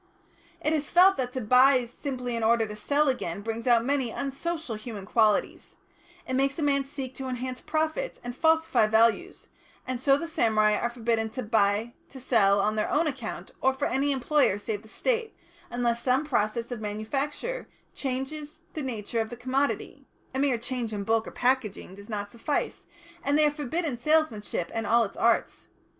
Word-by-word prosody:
It 305 Hz, -, +3 dB
is 300 Hz, -1 st, -1 dB
felt 375 Hz, +2 st, +6 dB
that 250 Hz, -1 st, -2 dB
to 260 Hz, -, -2 dB
buy 250 Hz, +3 st, +5 dB
simply 250 Hz, 0 st, -4 dB
in 230 Hz, -, -2 dB
order 225 Hz, 0 st, +3 dB
to 210 Hz, -1 st, -7 dB
sell 285 Hz, +8 st, +1 dB
again 200 Hz, -8 st, -1 dB
brings 225 Hz, +2 st, -4 dB
out 235 Hz, -1 st, +4 dB
many 270 Hz, -3 st, +1 dB
unsocial 280 Hz, +3 st, -3 dB
human 215 Hz, -2 st, -7 dB
qualities; 215 Hz, 0 st, +1 dB, 0.5 s
it 260 Hz, -, -3 dB
makes 275 Hz, +1 st, +1 dB
a 320 Hz, -, -1 dB
man 280 Hz, -1 st, +2 dB
seek 270 Hz, -2 st, -6 dB
to 265 Hz, -, -5 dB
enhance 255 Hz, 0 st, -4 dB
profits 315 Hz, +11 st, -2 dB
and 245 Hz, 0 st, -5 dB
falsify 320 Hz, -7 st, +3 dB
values, 220 Hz, -1 st, +2 dB, 0.4 s
and 255 Hz, -1 st, -3 dB
so 275 Hz, +2 st, +4 dB
the 335 Hz, -, -4 dB
samurai 215 Hz, -8 st, +3 dB
are 235 Hz, +3 st, 0 dB
forbidden 230 Hz, -2 st, -1 dB
to 255 Hz, +3 st, -5 dB
buy 215 Hz, +1 st, +1 dB, 0.2 s
to 265 Hz, -, -11 dB
sell 205 Hz, -6 st, +3 dB
on 210 Hz, +2 st, +1 dB
their 215 Hz, -, 0 dB
own 315 Hz, +3 st, +2 dB
account 265 Hz, -7 st, -4 dB
or 265 Hz, 0 st, +3 dB
for 280 Hz, -, -1 dB
any 280 Hz, +2 st, +1 dB
employer 275 Hz, -4 st, +2 dB
save 205 Hz, 0 st, -4 dB
the 220 Hz, -, -17 dB
State, 460 Hz, -, -1 dB, 0.3 s
unless 235 Hz, -1 st, 0 dB
some 260 Hz, +4 st, +2 dB
process 235 Hz, -3 st, -1 dB
of 240 Hz, -3 st, -4 dB
manufacture 270 Hz, -, -3 dB, 0.3 s
changes 280 Hz, +3 st, -4 dB
the 310 Hz, -, -4 dB
nature 230 Hz, -3 st, -2 dB
of 220 Hz, -, -4 dB
the 240 Hz, -, -8 dB
commodity 260 Hz, +3 st, -2 dB, 0.3 s
(a 265 Hz, -, -2 dB
mere 270 Hz, -3 st, +2 dB
change 235 Hz, -1 st, -4 dB
in 205 Hz, -1 st, -3 dB
bulk 225 Hz, +2 st, +1 dB
or -, -, -6 dB
packing 245 Hz, -7 st, -1 dB
does 200 Hz, +2 st, -13 dB
not 205 Hz, -2 st, -4 dB
suffice), 260 Hz, +5 st, -3 dB, 0.4 s
and 285 Hz, +1 st, +2 dB
they 305 Hz, -, +5 dB
are 295 Hz, -, +3 dB
forbidden 295 Hz, 0 st, -2 dB
salesmanship 240 Hz, -, 0 dB
and 225 Hz, -1 st, -2 dB
all 235 Hz, +1 st, +4 dB
its 200 Hz, -, -5 dB
arts. 230 Hz, 0 st, +1 dB
250 Hz, 185 wpm, -27 LUFS, 220-280 Hz, 0.5 s, felt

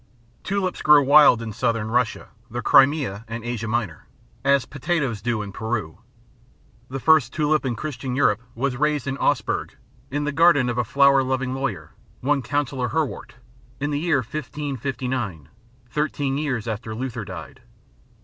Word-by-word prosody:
Tulips 190 Hz, -2 st, -2 dB
grow 150 Hz, -1 st, +6 dB
wild 140 Hz, -4 st, +6 dB
in 110 Hz, -2 st, -6 dB
Southern 115 Hz, -1 st, -1 dB
Russia, 120 Hz, -1 st, 0 dB, 0.2 s
the 120 Hz, +1 st, -5 dB
Crimea 135 Hz, -7 st, +4 dB
and 115 Hz, 0 st, -6 dB
Asia 120 Hz, -1 st, -3 dB
Minor, 110 Hz, -8 st, -3 dB, 0.4 s
as 140 Hz, -1 st, +3 dB
potatoes 145 Hz, -, -2 dB
do 115 Hz, -1 st, -1 dB
in 100 Hz, -, -7 dB
Peru. 110 Hz, -7 st, -4 dB, 0.9 s
The 135 Hz, +1 st, -4 dB
first 160 Hz, +1 st, +4 dB
tulip 155 Hz, -2 st, +1 dB
in 120 Hz, -, -1 dB
Christian 130 Hz, -2 st, -4 dB
Europe 115 Hz, -5 st, +2 dB
was 125 Hz, +1 st, -1 dB
raised 150 Hz, -1 st, 0 dB
in 135 Hz, -1 st, -2 dB
Augsburg, 145 Hz, -, 0 dB, 0.3 s
in 145 Hz, +2 st, -2 dB
the 150 Hz, -, -1 dB
garden 160 Hz, -5 st, +4 dB
of 120 Hz, 0 st, -1 dB
a -, -, +2 dB
flower 140 Hz, +3 st, +4 dB
loving 130 Hz, 0 st, -1 dB
lawyer, 135 Hz, -7 st, -4 dB, 0.3 s
one 140 Hz, +1 st, +1 dB
Counsellor 135 Hz, -1 st, -1 dB
Herwart, 155 Hz, -6 st, -3 dB, 0.4 s
in 145 Hz, +1 st, -2 dB
the 145 Hz, -, 0 dB
year 155 Hz, -4 st, +2 dB
1559, 130 Hz, -, -4 dB, 0.4 s
thirteen 145 Hz, -1 st, -1 dB
years 130 Hz, -6 st, -2 dB
after 110 Hz, 0 st, -4 dB
Luther 125 Hz, +1 st, -4 dB
died. -, -, -9 dB
130 Hz, 150 wpm, -23 LUFS, 115-145 Hz, 0.9 s, grow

